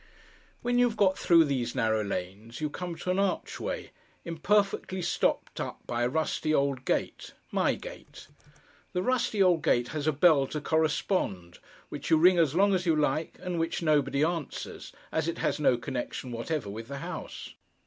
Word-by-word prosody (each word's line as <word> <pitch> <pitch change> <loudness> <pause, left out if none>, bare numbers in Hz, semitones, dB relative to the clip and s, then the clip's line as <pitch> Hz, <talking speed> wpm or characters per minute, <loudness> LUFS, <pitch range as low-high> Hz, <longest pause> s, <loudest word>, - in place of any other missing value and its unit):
When 245 0 +2
you 245 - +5
have 220 - -8
got 190 -2 +4
through 170 -4 +5
these 130 -4 -2
narrow 110 -3 +1
lanes, 100 +4 -5
you 150 -1 -2
come 175 0 -5
to 180 +2 -3
an 185 - 0
archway, 200 -1 -2 0.3
imperfectly 190 +2 0
stopped - - 0
up - - -5
by 120 - -2
a 120 - +2
rusty 155 +1 0
old 140 -2 0
gate—my - - -1
gate. - - -11 0.7
The 180 0 0
rusty 235 -4 +2
old 175 -3 +4
gate 120 0 +2
has 150 -1 -3
a - - +5
bell 150 -2 +4
to 150 - -4
correspond, 155 - -1 0.3
which - - -6
you 160 - +6
ring 175 +2 +6
as 160 -3 +2
long 200 +2 +4
as 180 -1 0
you 165 - +4
like, 155 +1 0
and 180 -2 -2
which 165 +1 -1
nobody 150 -2 +2
answers, 165 -3 -3 0.2
as 160 0 0
it 170 0 -2
has - - -1
no 130 -4 +3
connection 125 +1 -5
whatever 120 +2 -3
with 110 +2 -7
the 140 - -6
house. - - -7
155 Hz, 175 wpm, -29 LUFS, 130-180 Hz, 0.7 s, you